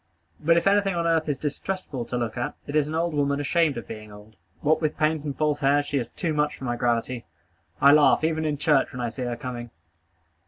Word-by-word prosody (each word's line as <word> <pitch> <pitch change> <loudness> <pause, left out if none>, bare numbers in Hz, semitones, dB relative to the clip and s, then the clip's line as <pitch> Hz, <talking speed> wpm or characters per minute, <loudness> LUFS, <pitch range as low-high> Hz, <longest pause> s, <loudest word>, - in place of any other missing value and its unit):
But 165 +2 +4
if 170 - +1
anything 195 -1 +3
on 170 -1 -1
earth 160 -2 +1
is 145 - 0
distressful 150 -3 -4
to 125 - -3
look 120 -2 -2
at, 120 - -3
it 145 - -5
is 150 -1 +3
an 155 - -4
old 170 0 0
woman 140 -1 +1
ashamed 150 0 +1
of 120 - -6
being 110 -1 -9
old. 105 +1 -14 0.3
What 155 +2 +2
with 155 -2 -1
paint 155 -1 +1
and 140 -2 -4
false 150 -1 +1
hair, 145 0 +3
she 140 -1 -1
is 120 - -3
too 165 -4 -1
much 150 0 0
for - - -11
my 120 -2 -1
gravity. 120 0 -1 0.5
I 140 - +7
laugh, 150 +1 +5
even 160 0 +1
in 150 -2 -1
church, 145 -2 +2
when 125 - -7
I 120 -1 -1
see 130 - -8
her 120 -1 -2
coming. 120 -1 -6
145 Hz, 240 wpm, -25 LUFS, 125-155 Hz, 0.5 s, I